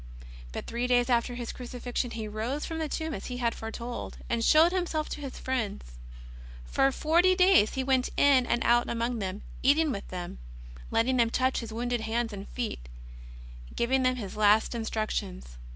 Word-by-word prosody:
But -, -, -5 dB
three 240 Hz, +2 st, -2 dB
days 245 Hz, 0 st, +3 dB
after 240 Hz, +1 st, +1 dB
His 240 Hz, -1 st, -4 dB
Crucifixion 245 Hz, 0 st, -4 dB
He 225 Hz, -2 st, -5 dB
rose 225 Hz, +8 st, -3 dB
from 325 Hz, 0 st, -4 dB
the 315 Hz, -2 st, -2 dB
tomb 315 Hz, +1 st, -3 dB
as 195 Hz, -, -6 dB
He 250 Hz, -, -5 dB
had 235 Hz, -2 st, 0 dB
foretold, 235 Hz, +2 st, -6 dB
and 235 Hz, -1 st, +1 dB
showed 315 Hz, +7 st, +6 dB
Himself 345 Hz, -4 st, -1 dB
to 300 Hz, -, -5 dB
His 275 Hz, -2 st, -6 dB
friends. 225 Hz, -, -3 dB, 0.7 s
For 270 Hz, -, +2 dB
forty 345 Hz, +6 st, +3 dB
days 365 Hz, -, +5 dB
He 265 Hz, -, 0 dB
went 260 Hz, -1 st, +2 dB
in 265 Hz, -3 st, +5 dB
and 240 Hz, -, +1 dB
out 240 Hz, 0 st, +3 dB
among 235 Hz, 0 st, -1 dB
them, 195 Hz, 0 st, -4 dB, 0.2 s
eat 280 Hz, +3 st, +5 dB
ing 320 Hz, -2 st, +2 dB
with 200 Hz, -, -5 dB
them, 175 Hz, -, -6 dB, 0.5 s
letting 255 Hz, +3 st, +2 dB
them 235 Hz, -2 st, +4 dB
touch 260 Hz, +2 st, +1 dB
His 230 Hz, -2 st, -7 dB
wounded 240 Hz, +1 st, -2 dB
hands 225 Hz, 0 st, -1 dB
and 200 Hz, 0 st, -7 dB
feet, 220 Hz, -, -5 dB, 0.9 s
giving 260 Hz, +3 st, +2 dB
them 255 Hz, 0 st, +2 dB
His 210 Hz, -6 st, -6 dB
last 210 Hz, +2 st, +4 dB
instructions. 140 Hz, -, -3 dB
240 Hz, 185 wpm, -28 LUFS, 220-265 Hz, 0.9 s, showed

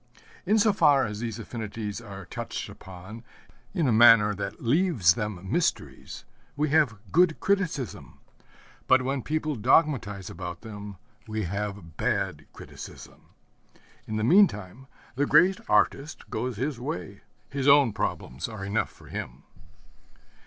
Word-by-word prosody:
In 215 Hz, +3 st, +4 dB
so 215 Hz, -1 st, +4 dB
far 145 Hz, -7 st, +4 dB
as 105 Hz, -1 st, -5 dB
these 115 Hz, -2 st, -4 dB
affinities 110 Hz, -1 st, -6 dB
are 100 Hz, -4 st, -9 dB
touched -, -, -6 dB
upon 95 Hz, +5 st, -11 dB, 0.5 s
in 160 Hz, 0 st, 0 dB
a -, -, +3 dB
manner 110 Hz, -2 st, +7 dB
that 100 Hz, -, -5 dB
leaves 125 Hz, -, +3 dB
them 105 Hz, -4 st, -5 dB
mysteries, -, -, -2 dB, 0.3 s
we 150 Hz, +1 st, +1 dB
have 145 Hz, -7 st, +3 dB
good 170 Hz, 0 st, +3 dB
criticism; 185 Hz, -, -2 dB, 0.7 s
but 130 Hz, 0 st, +5 dB
when 135 Hz, +1 st, -1 dB
people 155 Hz, +2 st, -2 dB
dogmatize 115 Hz, -, +2 dB
about 90 Hz, 0 st, -7 dB
them, 105 Hz, -3 st, -9 dB, 0.3 s
we 110 Hz, 0 st, -3 dB
have 100 Hz, -3 st, -5 dB
bad -, -, -1 dB
criticism. -, -, -12 dB, 0.8 s
In 110 Hz, -, -4 dB
the 110 Hz, -, -1 dB
meantime 130 Hz, -, +3 dB, 0.3 s
the 145 Hz, +3 st, 0 dB
great 180 Hz, +7 st, +5 dB
artist 145 Hz, +3 st, +1 dB
goes 120 Hz, 0 st, -3 dB
his 135 Hz, +1 st, -2 dB
way. 90 Hz, -, -6 dB, 0.3 s
His 140 Hz, 0 st, -2 dB
own 140 Hz, -5 st, +6 dB
problems 65 Hz, -9 st, -3 dB
are 110 Hz, -3 st, -7 dB
enough 105 Hz, +1 st, -1 dB
for -, -, -18 dB
him. 65 Hz, +4 st, -7 dB
115 Hz, 135 wpm, -27 LUFS, 100-145 Hz, 0.8 s, manner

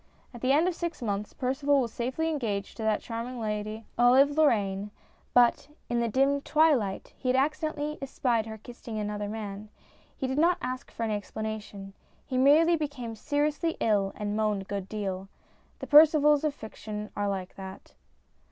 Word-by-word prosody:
At 240 Hz, -, -10 dB
the 255 Hz, -, +2 dB
end 310 Hz, +5 st, +4 dB
of 365 Hz, -, +1 dB
six 340 Hz, 0 st, -4 dB
months 205 Hz, -1 st, -2 dB
Percival 275 Hz, +2 st, +1 dB
was 235 Hz, -4 st, -2 dB
safely 260 Hz, +7 st, -2 dB
engaged 230 Hz, -11 st, -2 dB
to -, -, -6 dB
that 220 Hz, -1 st, +1 dB
charming 235 Hz, +2 st, -5 dB
lady, 215 Hz, 0 st, -3 dB
Olive 260 Hz, +4 st, +6 dB
Lorraine; 210 Hz, -10 st, +2 dB, 0.4 s
but 245 Hz, +3 st, +4 dB, 0.2 s
"in 240 Hz, 0 st, +1 dB
the 235 Hz, -, +1 dB
dim 275 Hz, +4 st, +2 dB
twilight" 285 Hz, -12 st, +2 dB
he 255 Hz, -, -3 dB
had 250 Hz, -, +3 dB
accidentally 300 Hz, +2 st, -1 dB
espied 245 Hz, -4 st, 0 dB
her 220 Hz, 0 st, -7 dB
kissing 230 Hz, 0 st, -9 dB
another 210 Hz, -1 st, -3 dB
man. 210 Hz, -1 st, -6 dB, 0.5 s
He 270 Hz, -, -2 dB
did 265 Hz, +2 st, -1 dB
not 345 Hz, +3 st, +4 dB
ask 255 Hz, 0 st, -5 dB
for 230 Hz, -, -5 dB
any 220 Hz, -1 st, 0 dB
explanation. 210 Hz, -1 st, -5 dB, 0.3 s
He 255 Hz, -2 st, -1 dB
merely 310 Hz, +6 st, +6 dB
became 280 Hz, -7 st, -4 dB
seriously 295 Hz, +7 st, -1 dB
ill 200 Hz, -3 st, +2 dB
and 205 Hz, 0 st, -3 dB
moaned 210 Hz, -2 st, 0 dB
a -, -, -17 dB
good 195 Hz, -1 st, -5 dB
deal. 195 Hz, -3 st, -4 dB, 0.5 s
The -, -, -7 dB
Percivals 300 Hz, -1 st, +6 dB
of 300 Hz, -2 st, 0 dB
fiction 210 Hz, -2 st, -7 dB
are 205 Hz, 0 st, -1 dB
like 190 Hz, -2 st, -4 dB
that. 190 Hz, 0 st, -10 dB
235 Hz, 170 wpm, -28 LUFS, 210-285 Hz, 0.5 s, Olive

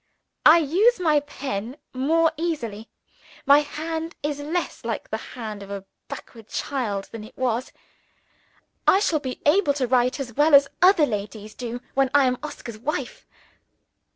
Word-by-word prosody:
I 315 Hz, +2 st, +9 dB
use 370 Hz, -, +3 dB
my 310 Hz, -4 st, +3 dB
pen 265 Hz, -4 st, -5 dB, 0.2 s
more 320 Hz, +5 st, +2 dB
easily; 235 Hz, -10 st, -4 dB, 0.6 s
my 285 Hz, +1 st, +7 dB
hand 320 Hz, +3 st, -4 dB
is 290 Hz, -1 st, -2 dB
less 320 Hz, +5 st, -3 dB
like -, -, -3 dB
the -, -, -1 dB, 0.2 s
hand 215 Hz, -4 st, -6 dB
of 200 Hz, -, -10 dB
a 200 Hz, -1 st, -6 dB, 0.2 s
backward 225 Hz, -2 st, -10 dB
child 215 Hz, -8 st, -3 dB
than 225 Hz, -2 st, -7 dB
it 215 Hz, -, -14 dB
was. 250 Hz, 0 st, -1 dB, 1.2 s
I 385 Hz, -, +6 dB
shall 335 Hz, -6 st, +1 dB
be 260 Hz, -3 st, -6 dB
able 295 Hz, -1 st, +4 dB
to 270 Hz, -3 st, 0 dB
write 250 Hz, +2 st, +2 dB
as 250 Hz, -3 st, -5 dB
well 295 Hz, +4 st, +5 dB
as 280 Hz, 0 st, +7 dB
other 365 Hz, -4 st, +6 dB
ladies 210 Hz, -2 st, -5 dB
do 245 Hz, 0 st, -6 dB
when 270 Hz, -1 st, +2 dB
I 285 Hz, -2 st, +6 dB
am 250 Hz, -1 st, 0 dB
Oscar's 235 Hz, -7 st, -8 dB
wife. 275 Hz, 0 st, -4 dB
275 Hz, 155 wpm, -24 LUFS, 230-310 Hz, 1.2 s, I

